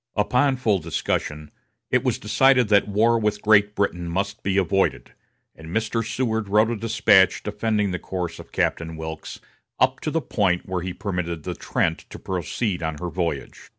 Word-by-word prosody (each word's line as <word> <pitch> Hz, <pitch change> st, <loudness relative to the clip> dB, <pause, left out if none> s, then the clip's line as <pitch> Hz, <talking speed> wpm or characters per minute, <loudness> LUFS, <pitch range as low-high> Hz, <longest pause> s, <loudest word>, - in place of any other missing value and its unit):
Upon 125 Hz, +6 st, +2 dB
full 110 Hz, -6 st, +1 dB
discussion, 75 Hz, -2 st, -3 dB, 0.4 s
it -, -, +3 dB
was -, -, 0 dB
decided 130 Hz, -4 st, +3 dB
that 100 Hz, -1 st, +4 dB
war 115 Hz, +3 st, +3 dB
with 105 Hz, -1 st, -1 dB
Great 105 Hz, -1 st, +4 dB
Britain 90 Hz, -4 st, -1 dB
must 100 Hz, +5 st, -2 dB
be 100 Hz, 0 st, 0 dB
avoided, 95 Hz, 0 st, 0 dB, 0.4 s
and 80 Hz, -, -12 dB
Mr. 115 Hz, +5 st, -1 dB
Seward 110 Hz, -2 st, -2 dB
wrote 110 Hz, +3 st, +3 dB
a -, -, -1 dB
despatch 105 Hz, -3 st, +3 dB
defending 105 Hz, -1 st, -1 dB
the 90 Hz, -, -3 dB
course 90 Hz, -3 st, -4 dB
of -, -, -12 dB
Captain 80 Hz, -1 st, -1 dB
Wilkes 80 Hz, 0 st, -7 dB, 0.4 s
up 130 Hz, 0 st, +2 dB
to -, -, -3 dB
the 165 Hz, -, 0 dB
point 100 Hz, -, 0 dB
where 95 Hz, -1 st, -2 dB
he 90 Hz, +1 st, -4 dB
permitted 90 Hz, -5 st, -4 dB
the -, -, -3 dB
Trent -, -, -1 dB
to -, -, -9 dB
proceed 90 Hz, +2 st, -3 dB
on 80 Hz, -2 st, -3 dB
her 90 Hz, +2 st, -4 dB
voyage. 85 Hz, -1 st, -4 dB
100 Hz, 175 wpm, -23 LUFS, 90-110 Hz, 0.4 s, that